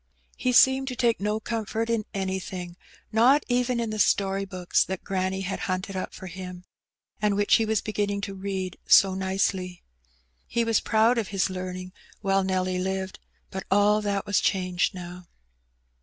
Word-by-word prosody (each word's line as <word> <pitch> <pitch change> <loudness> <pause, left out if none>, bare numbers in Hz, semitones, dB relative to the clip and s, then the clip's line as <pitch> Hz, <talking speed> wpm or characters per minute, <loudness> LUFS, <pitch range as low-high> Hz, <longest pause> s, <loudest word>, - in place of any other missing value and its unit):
He 255 - 0
seemed 265 +2 +5
to 255 - -3
take 235 -2 +2
no 210 +1 0
comfort 225 0 -3
in 230 -2 0
anything^ 190 -2 -4 0.4
not 250 +6 +5
even 245 0 +1
in 230 -2 -2
the 215 - -4
story 195 -1 +2
books 185 -2 +1
that 190 -1 -5
granny 190 0 -1
had 190 0 -3
hunted 185 +1 -2
up 185 - -3
for - - -9
him, 180 0 -8 0.6
and 210 -1 +2
which 205 0 +4
he 225 -2 0
was 220 -1 +1
beginning 205 -1 -1
to 200 -1 -4
read 190 -1 -4
so 195 -1 +7
nicely. 190 -1 -1 0.6
He 235 - 0
was 230 -1 +2
proud 225 +2 +3
of 215 - -2
his 195 -1 0
learning 185 0 -6 0.3
while 195 -1 +2
Nelly 185 -1 0
lived; 190 0 -3 0.3
but 190 0 -4
all 205 +2 +4
tluKt 200 -1 -1
was 205 - +2
changed 185 -1 0
now. 180 0 -9
195 Hz, 170 wpm, -26 LUFS, 185-215 Hz, 0.6 s, so